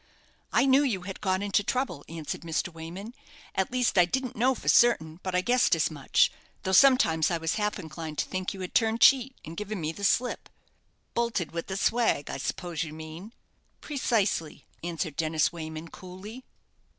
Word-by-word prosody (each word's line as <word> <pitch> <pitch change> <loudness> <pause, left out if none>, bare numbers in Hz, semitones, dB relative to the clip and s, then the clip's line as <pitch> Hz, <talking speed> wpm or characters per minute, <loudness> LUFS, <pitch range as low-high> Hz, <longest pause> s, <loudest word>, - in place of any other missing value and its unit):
"I 245 - +4
knew 270 +1 +5
you 220 -11 0
had 190 0 -7
got 190 0 0
into 205 0 +1
trouble," 205 - -2
answered 160 -2 -5
Mr. 165 +1 -2
Wayman. 175 +8 -8 0.4
"At 190 +3 0
least, 250 -6 +2
I 175 - +7
didn't 255 +6 -2
know 255 +4 +2
for - - -10
certain, 160 -9 +4
but 185 -1 -3
I 180 - +3
guessed 245 +5 +3
as - - +1
much; - - +2 0.3
though 190 - -1
sometimes 185 - +5
I 170 - 0
was 165 0 -1
half 210 0 0
inclined 160 -3 -7
to - - +1
think 185 0 -3
you 195 - -8
had 180 - -6
turned 225 0 +2
cheat, 265 -1 +5
and 160 - -8
given 210 +2 -4
me 155 -1 -2
the 200 +5 -10
slip." 235 +6 +1 0.6
"Bolted 235 -8 -1
with 170 0 -4
the 190 - -3
swag, 225 -9 +1
I - - -4
suppose 175 -4 -3
you 155 -2 -7
mean?" 160 +6 -9 0.5
"Precisely!" 220 - -1 0.2
answered 165 -3 -3
Dennis 155 0 +1
Wayman, 160 0 -7
coolly. 195 +9 -10
185 Hz, 185 wpm, -28 LUFS, 165-230 Hz, 0.6 s, I